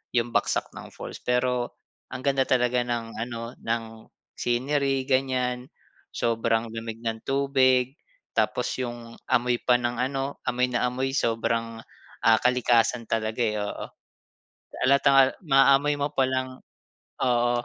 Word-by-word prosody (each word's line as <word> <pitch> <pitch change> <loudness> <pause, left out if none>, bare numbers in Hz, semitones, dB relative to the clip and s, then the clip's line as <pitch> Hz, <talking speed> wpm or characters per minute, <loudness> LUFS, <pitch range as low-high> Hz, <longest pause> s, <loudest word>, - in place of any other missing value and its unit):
yung 120 0 +1
bagsak - - 0
ng - - -9
falls. - - -8
Pero 125 0 0 0.4
ang 130 0 -6
ganda 135 -1 +2
talaga 125 -1 +2
ng 120 -2 -3
ano 115 +1 -5
ng 115 0 -1 0.5
scenery 135 +2 0
ganyan, 130 -1 0 0.4
sobrang 115 0 0
lamig 115 0 -6
ng 115 -1 -4
tubig, 135 -1 +2 0.4
tapos - - +1 0.2
yung 120 -1 -7 0.2
amoy 120 0 +2
pa 125 - +4
ng 120 0 -1
ano, 135 +1 -2
amoy 125 0 +1
na 120 -1 0
amoy 130 +2 -2
sobrang, 115 -1 -1 0.5
ah, 110 0 +6
kalikasan 125 -1 +2
talaga, 110 +1 -1
eh, 110 -2 +1
oo. 105 - -5 1.0
Halatang 140 +1 +4
al 135 -1 +7 0.2
maamoy 140 0 +4
mo 145 0 -1
pa 135 - +2
lang 130 0 -3 0.6
Oo. 120 -1 +2
125 Hz, 135 wpm, -26 LUFS, 115-130 Hz, 1.0 s, al